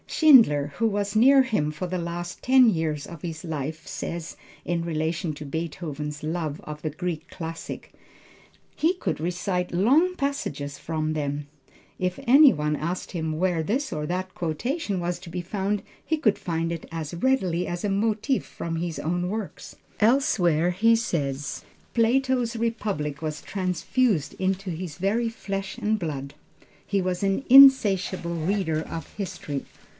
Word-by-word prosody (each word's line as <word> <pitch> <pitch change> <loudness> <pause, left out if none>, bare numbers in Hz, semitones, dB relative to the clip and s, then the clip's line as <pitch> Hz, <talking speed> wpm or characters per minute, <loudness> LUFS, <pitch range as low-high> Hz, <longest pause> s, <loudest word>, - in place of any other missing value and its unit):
Schindler, 185 - +5
who 230 - +2
was 205 -1 -1
near 265 +4 +7
him 210 -12 0
for 180 +4 -4
the 185 +1 -2
last 175 0 -5
ten 255 -2 +6
years 160 -6 -1
of 170 -3 -10
his 160 -3 -6
life 155 -1 -4
says 170 -1 -5 0.3
in 170 -1 -1
relation 165 0 -2
to 150 +1 -8
Beethoven's 150 -1 -4
love 155 -2 -2
of 150 0 -7
the 155 - -2
Greek 165 +1 -4
classics. 165 -1 -6 0.9
"He 335 +4 +2
could 360 - -2
recite 180 +2 -2
long 285 - +3
passages 145 - -3
from 155 -1 -2
them. 145 -1 -3 0.5
If 180 0 -2
any 280 +3 +8
one 150 0 -1
asked 170 +5 -4
him 160 -3 -2
where 175 -2 +1
this 255 - -1
or 150 -1 -3
that 185 +2 -3
quotation 200 - -2
was 175 0 -2
to 180 -1 -11
be 180 +1 -4
found 200 +3 -2 0.2
he 315 - 0
could 220 -9 +2
find 165 -1 -2
it 165 -2 -5
as 160 -2 -5
readily 180 -4 +1
as 175 0 -4
a 205 - 0
motive 220 +6 +1
from 165 -1 -5
his 165 -3 -3
own 175 +2 -1
works." 215 -1 -6 0.2
Elsewhere 190 - +3
he 225 +6 +4
says, 145 -11 -2 0.3
"Plato's 245 0 +2
Republic 205 -11 -2
was 155 -1 -4
transfused 185 - 0
into 190 0 -1
his 165 -2 -6
very 215 +6 +1
flesh 195 -3 -5
and 215 +1 +1
blood." 140 -7 -4 0.5
He 200 -1 0
was 185 +1 -2
an 195 +6 +1
insatiable 205 -10 +6
reader 165 -1 0
of 160 -1 -7
history. 150 -8 -5
180 Hz, 155 wpm, -25 LUFS, 160-215 Hz, 0.9 s, any